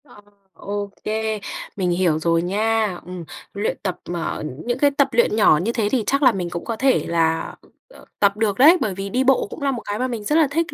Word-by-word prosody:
Ờ, 245 Hz, -7 st, -17 dB, 0.3 s
ô 205 Hz, 0 st, -5 dB
kê, 220 Hz, 0 st, -2 dB, 0.4 s
mình 185 Hz, -3 st, -1 dB
hiểu 175 Hz, -3 st, +1 dB
rồi 165 Hz, +1 st, +1 dB
nha. 210 Hz, +1 st, 0 dB
Ừm, 180 Hz, -1 st, -7 dB, 0.3 s
luyện 205 Hz, +2 st, -2 dB
tập 185 Hz, -3 st, -2 dB
mà 175 Hz, -1 st, -3 dB
ờ, -, -, -5 dB, 0.2 s
những 240 Hz, 0 st, -1 dB
cái 285 Hz, 0 st, +4 dB
tập 280 Hz, 0 st, +2 dB
luyện 235 Hz, -2 st, +2 dB
nhỏ 210 Hz, -8 st, +5 dB
như 190 Hz, +9 st, -1 dB
thế 225 Hz, -4 st, 0 dB
thì 250 Hz, -4 st, +1 dB
chắc 275 Hz, +1 st, +1 dB
là 255 Hz, -, +7 dB
mình 180 Hz, -5 st, -3 dB
cũng 170 Hz, 0 st, -6 dB
có 230 Hz, -, -3 dB
thể 265 Hz, +3 st, +2 dB
là, 165 Hz, -1 st, 0 dB, 0.3 s
ờ, -, -, -16 dB
tập 200 Hz, 0 st, +3 dB
được 210 Hz, -3 st, 0 dB
đấy, 310 Hz, +8 st, +7 dB
bởi 205 Hz, -, 0 dB
vì 195 Hz, +1 st, -5 dB
đi 250 Hz, +5 st, +1 dB
bộ 265 Hz, -4 st, +3 dB
cũng -, -, -9 dB
là 280 Hz, -1 st, +1 dB
một 245 Hz, -3 st, -4 dB
cái 205 Hz, +1 st, -3 dB
mà 255 Hz, -, 0 dB
mình 235 Hz, -4 st, -5 dB
rất 295 Hz, -, 0 dB
là 320 Hz, -2 st, +5 dB
thích 330 Hz, +3 st, -1 dB
215 Hz, 245 wpm, -21 LUFS, 185-255 Hz, 0.4 s, là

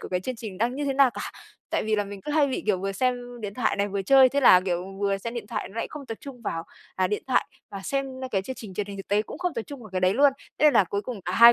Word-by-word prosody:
của -, -, -7 dB
cái 180 Hz, -1 st, -1 dB
chương 255 Hz, +5 st, -4 dB
trình 210 Hz, -5 st, -7 dB
đang 235 Hz, +4 st, +1 dB
như 290 Hz, +1 st, -2 dB
thế 275 Hz, -, +1 dB
nào 270 Hz, -2 st, +5 dB
cả, -, -, -7 dB, 0.5 s
tại -, -, +1 dB
vì 215 Hz, 0 st, +1 dB
là 205 Hz, -, +1 dB
mình 200 Hz, -1 st, -8 dB
cứ 295 Hz, -, -5 dB
hay 300 Hz, -2 st, +4 dB
bị, 265 Hz, -, -2 dB
kiểu, 205 Hz, -4 st, +2 dB
vừa 195 Hz, +1 st, -2 dB
xem 245 Hz, +2 st, -2 dB
điện 205 Hz, -2 st, -5 dB
thoại 245 Hz, -1 st, +1 dB
này, 200 Hz, 0 st, +1 dB
vừa 200 Hz, 0 st, -2 dB
chơi, 265 Hz, +4 st, +7 dB
thế 280 Hz, +3 st, 0 dB
là, 185 Hz, -8 st, +8 dB
kiểu, 180 Hz, -1 st, -1 dB, 0.2 s
vừa 200 Hz, -1 st, +1 dB
xem 230 Hz, +4 st, -5 dB
điện 225 Hz, -4 st, -5 dB
thoại -, -, -4 dB
nó 200 Hz, -, -14 dB
lại 230 Hz, -, -1 dB
không 290 Hz, -3 st, -8 dB
tập 225 Hz, -, -4 dB
trung 255 Hz, -4 st, -10 dB
vào, 165 Hz, -5 st, -3 dB, 0.3 s
à, 185 Hz, 0 st, +2 dB
điện 210 Hz, +2 st, -2 dB
thoại 260 Hz, -, +2 dB, 0.2 s
và 195 Hz, -, -6 dB
xem 275 Hz, 0 st, -1 dB, 0.2 s
cái 195 Hz, -4 st, 0 dB
chương 260 Hz, -, -5 dB
trình 200 Hz, -5 st, -9 dB
truyền 205 Hz, 0 st, -2 dB
hình 200 Hz, -1 st, -7 dB
thực 195 Hz, -, -8 dB
tế 205 Hz, +1 st, +3 dB
cũng 285 Hz, -, -9 dB
không 360 Hz, -1 st, -1 dB
tập 230 Hz, -, -2 dB
trung 280 Hz, +3 st, -9 dB
vào 215 Hz, -4 st, -11 dB
cái 185 Hz, -, -1 dB
đấy 185 Hz, +1 st, +3 dB
luôn, 280 Hz, +3 st, +5 dB, 0.3 s
thế -, -, +3 dB
nên 300 Hz, -, +6 dB
là 200 Hz, -, +6 dB
cuối 200 Hz, +3 st, -2 dB
cùng 225 Hz, -2 st, -6 dB
cả 180 Hz, -, -2 dB
hai 235 Hz, +4 st, +9 dB
220 Hz, 335 wpm, -26 LUFS, 195-260 Hz, 0.5 s, hai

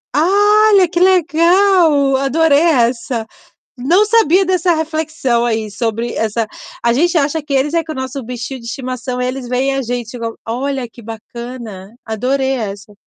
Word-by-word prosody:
Olha, 405 Hz, +2 st, +4 dB
que 345 Hz, -1 st, -1 dB
legal! 345 Hz, -4 st, +3 dB
Adorei 285 Hz, +2 st, +3 dB
essa. 240 Hz, -6 st, +1 dB, 0.5 s
Não 335 Hz, +12 st, +3 dB
sabia 395 Hz, -4 st, +3 dB
dessa 365 Hz, -2 st, +1 dB
reflexão 315 Hz, -6 st, -1 dB
aí 220 Hz, -2 st, -2 dB
sobre 230 Hz, +2 st, -3 dB
essa 225 Hz, +1 st, -1 dB, 0.4 s
a 235 Hz, -, +3 dB
gente 335 Hz, +7 st, +1 dB
acha 300 Hz, +1 st, 0 dB
que 285 Hz, -1 st, -4 dB
eles 270 Hz, +3 st, +1 dB
é 335 Hz, -1 st, +1 dB
que 320 Hz, -, -10 dB
é -, -, -4 dB
o -, -, -10 dB
nosso 260 Hz, +1 st, -5 dB
bichinho 250 Hz, +2 st, -6 dB
de 230 Hz, -, -12 dB
estimação 250 Hz, +1 st, -4 dB
eles 255 Hz, 0 st, -4 dB
vêem 260 Hz, +2 st, 0 dB
a 270 Hz, -, -1 dB
gente 240 Hz, -1 st, -5 dB
igual. 230 Hz, -2 st, -5 dB
Olha, 260 Hz, +2 st, -3 dB
que 235 Hz, -, -15 dB
bacana! 225 Hz, -2 st, -9 dB
Adorei 260 Hz, +5 st, -1 dB
essa. 205 Hz, -4 st, -5 dB
265 Hz, 160 wpm, -16 LUFS, 235-325 Hz, 0.5 s, Olha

